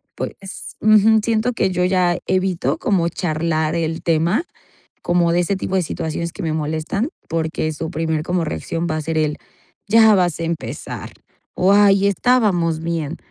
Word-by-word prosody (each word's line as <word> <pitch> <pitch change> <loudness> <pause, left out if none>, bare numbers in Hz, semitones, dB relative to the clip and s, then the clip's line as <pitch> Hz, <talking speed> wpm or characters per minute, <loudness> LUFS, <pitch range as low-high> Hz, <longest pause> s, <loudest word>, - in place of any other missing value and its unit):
pues 195 -1 -7
ujú, 215 +1 +5
siento 225 +1 +1
que 190 - +1
yo 180 0 0
ya 180 -2 +2
evito 185 -1 0
como 180 -5 +1
charlar 160 -2 -1
el 165 -1 -2
tema, 170 - +1 0.6
como 175 -1 +2
de 175 - +2
ese 190 +3 0
tipo 190 - -4
de 185 - +3
situaciones 165 +1 -4
que - - -8
me 160 - -1
molestan, 160 - -2 0.2
porque 160 -1 -2
su 160 +2 -5
primer 160 0 -1
como 175 -1 0
reacción 165 +2 -3
va 155 - -1
a - - -3
ser 160 +1 -3
el 150 -1 0 0.5
ya 220 0 +6
vas 180 -4 +1
a - - -2
empezar 165 -1 -5 0.4
o, 190 +2 +3
ay, 200 -1 +5
estábamos 195 -8 +2
bien. 165 -1 -3
170 Hz, 165 wpm, -20 LUFS, 160-195 Hz, 0.6 s, ya